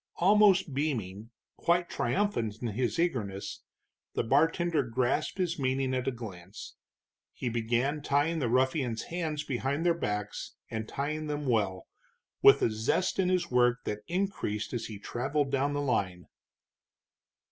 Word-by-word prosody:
Almost 195 -4 +4
beaming, 115 -8 -2 0.3
quite 175 0 +2
triumphant 180 - 0
in 120 - 0
his 120 +6 -1
eagerness, 115 - -2 0.5
the - - +1
bartender 160 +5 +2
grasped 125 +6 -1
his 175 -3 -1
meaning 130 0 0
at 130 0 -1
a - - +2
glance. 100 -6 -9 0.6
He 125 - -3
began 120 +6 0
tying 145 +4 +1
the 125 -5 0
ruffians' 130 -1 +1
hands 155 -4 -2
behind 140 +5 -2
their 170 - +5
backs, 105 -9 -4 0.2
and 110 -1 -4
tying 155 +2 -3
them 150 0 -3
well, 105 -7 0 0.6
with - - +7
a - - +3
zest 115 - 0
in 185 -1 +3
his 180 -2 0
work 125 0 +3
that 105 - -3
increased 175 - -2
as 115 -2 -3
he 110 - -7
traveled 135 +7 -1
down 140 +1 +1
the 145 - -1
line. 95 -10 -1
130 Hz, 145 wpm, -30 LUFS, 115-155 Hz, 0.6 s, with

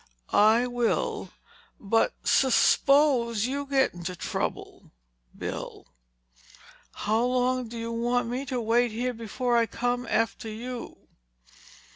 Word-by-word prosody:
"I 220 +4 +5
will. 245 -2 -1 0.5
But 225 - +1
su 265 - +4
suppose 255 -5 +3
you 280 +2 -3
get 270 -1 +2
into 175 +1 -6
trouble, - - -5 0.5
Bill. - - -6 1.2
How 220 +3 +2
long 250 0 +1
do 230 +1 -8
you 230 0 -4
want 240 +1 0
me 250 +3 -3
to 250 0 -2
wait 235 +2 +2
here 245 +3 -2
before 240 +2 -2
I 230 -1 +3
come 245 +3 -2
after 225 0 -1
you?" 240 +3 -8
240 Hz, 120 wpm, -27 LUFS, 225-250 Hz, 1.2 s, I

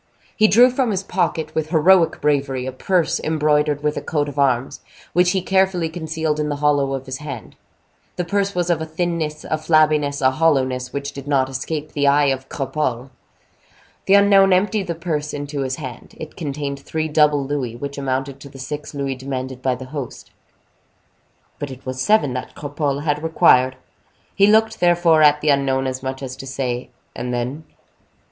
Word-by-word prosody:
He 215 - +5
drew 245 +4 +6
from 255 -1 0
his 195 -2 -1
pocket, 160 -4 -1
with 155 -1 -2
heroic 170 +1 +4
bravery, 135 -3 0
a 130 - -3
purse 175 +6 0
embroidered 150 -1 +1
with 150 0 0
a - - -2
coat 150 -2 -1
of 145 0 -6
arms, 135 0 +1 0.3
which 180 0 +4
he 190 -1 0
carefully 190 -3 +1
concealed 160 -2 -3
in 150 0 -1
the 145 - -1
hollow 145 -2 +1
of 135 0 -6
his 130 0 -5
hand. 135 -9 -8 0.6
This 180 - -2
purse 200 0 0
was 175 -1 +1
of 160 -2 0
a - - -2
thinness, 160 -2 -2
a 155 - -2
flabbiness, 155 -2 +2
a 130 -1 +3
hollowness, 130 -4 +1
which 140 0 -4
did 140 0 -9
not 135 -2 +2
escape 150 +4 -4
the 145 -1 0
eye 145 0 +4
of 130 0 -8
Cropole. 135 -2 -3 1.0
The 195 - +6
unknown 200 -1 +6
emptied 200 +1 +1
the 170 - -2
purse 155 -3 -3
into 145 0 -4
his 130 -1 -2
hand. 135 -5 -9
It 155 - -9
contained 140 -3 -4
three 155 +3 -3
double 150 -2 +3
louis, 135 -5 -3
which 140 +3 -6
amounted 135 0 -3
to 140 - -11
the 135 - -13
six 145 +3 -6
louis 140 -1 -2
demanded 130 -1 -5
by 130 -1 0
the 130 +1 -9
host. 140 -5 -7 1.3
But 145 - -4
it 130 0 -11
was 130 0 -4
seven 180 -7 +3
that 125 - -6
Cropole 145 -1 -3
had 150 -1 0
required. 130 -5 +4 0.6
He 200 0 +4
looked, 220 +1 +3
therefore, 175 -2 +4
at 150 0 +5
the 155 - +1
unknown, 135 -1 +2
as 130 0 -3
much 130 +1 -5
as 130 -1 -5
to 135 - -9
say, 125 -2 -3 0.3
"And 125 - -4
then?" 125 +6 -3
145 Hz, 185 wpm, -20 LUFS, 135-160 Hz, 1.3 s, drew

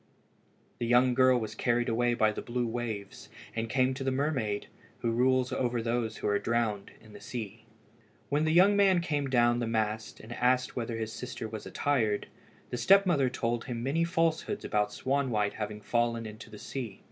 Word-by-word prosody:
The 120 - -1
young 125 +1 +4
girl 130 0 +5
was 110 -2 -5
carried 120 0 0
away 120 +1 +1
by 110 -2 +3
the - - -5
blue 120 0 -2
waves, 115 -4 -5 0.3
and 115 0 -2
came 130 +1 +2
to 135 +1 -5
the 135 - +1
mermaid 130 -7 -1 0.4
who 115 - 0
rules 130 +2 +2
over 120 -1 0
all 115 - -2
those 115 -1 -1
who - - -3
are 100 0 +2
drowned 115 -4 -1
in 110 -1 -17
the 105 - -11
sea. 110 -2 -7 0.6
When 145 +2 +1
the 155 - +2
young 185 +5 +6
man 195 -3 +5
came 145 -5 -1
down 120 -1 +3
the 120 - -1
mast, 110 -1 -2
and 115 +2 -9
asked 125 +1 +1
whether 115 -2 -3
his 110 0 -4
sister 125 -2 -6
was 110 -1 -7
attired, 115 -8 0 0.5
the 125 - -2
step 195 +8 +5
mother 140 -8 +2
told 120 -1 -2
him 120 -2 -4
many 145 +6 +1
falsehoods 165 +3 0
about 105 -1 +1
Swanwhite 125 -6 0
having 105 0 -5
fallen 115 0 0
into 110 +1 -9
the 105 - -10
sea. 115 -4 -6
120 Hz, 195 wpm, -30 LUFS, 110-130 Hz, 0.6 s, young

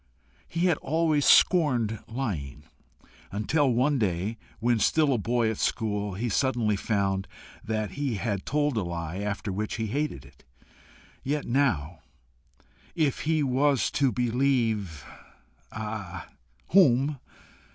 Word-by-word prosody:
He 170 - -3
had 180 -1 +2
always 155 -1 +1
scorned 125 - +4
lying, 80 - -4 0.7
until 130 +8 +1
one 130 +4 +2
day, 100 +2 -1 0.2
when 120 +1 +2
still 150 +5 +3
a 120 - 0
boy 115 +1 +1
at 110 - -6
school, 105 -3 -1
he 115 +5 -2
suddenly 120 -2 +1
found 95 -2 -1 0.4
that 110 -3 -2
he 140 -2 -2
had 100 -2 -2
told 145 -3 0
a - - +2
lie, 85 0 -4
after 105 0 -3
which 105 +3 -3
he 115 - -2
hated 130 - -3
it 70 0 -19 0.8
yet 145 +2 -2
now, 90 - 0 1.0
if 155 -6 +1
he 155 -2 +2
was 135 -1 +2
to 135 -3 +2
believe 115 - 0 0.7
ah! 105 -4 -6 0.4
whom? 145 -5 +4
115 Hz, 125 wpm, -27 LUFS, 100-140 Hz, 1.0 s, scorned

